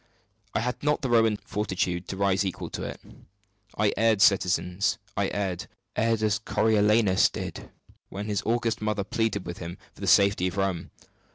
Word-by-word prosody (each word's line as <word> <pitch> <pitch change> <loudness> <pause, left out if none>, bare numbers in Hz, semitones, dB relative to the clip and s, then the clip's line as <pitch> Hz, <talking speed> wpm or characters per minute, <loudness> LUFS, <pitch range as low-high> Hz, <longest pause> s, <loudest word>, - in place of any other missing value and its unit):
I - - +2
had 125 +2 -3
not 150 0 +1
the 130 - -1
Roman 115 -2 +4
fortitude 95 -4 -2
to 95 - -5
rise 100 -1 +2
equal 95 -2 -4
to - - -5
it. - - -5 0.8
I 105 -1 +2
erred, 110 -2 +3
citizens 95 0 +2 0.2
erred 100 -2 -2 0.3
as 110 0 +1
Coriolanus 105 -2 +3
did, - - -6 0.4
when 100 +2 -5
his 105 -2 -1
august 115 -1 0
mother 105 -1 -1
pleaded 110 -1 -1
with 85 0 -6
him 85 +1 -6 0.2
for - - -17
the 100 - -3
safety 100 0 +4
of 95 +2 -5
Rome! 95 -4 -1
100 Hz, 160 wpm, -27 LUFS, 95-110 Hz, 0.8 s, Roman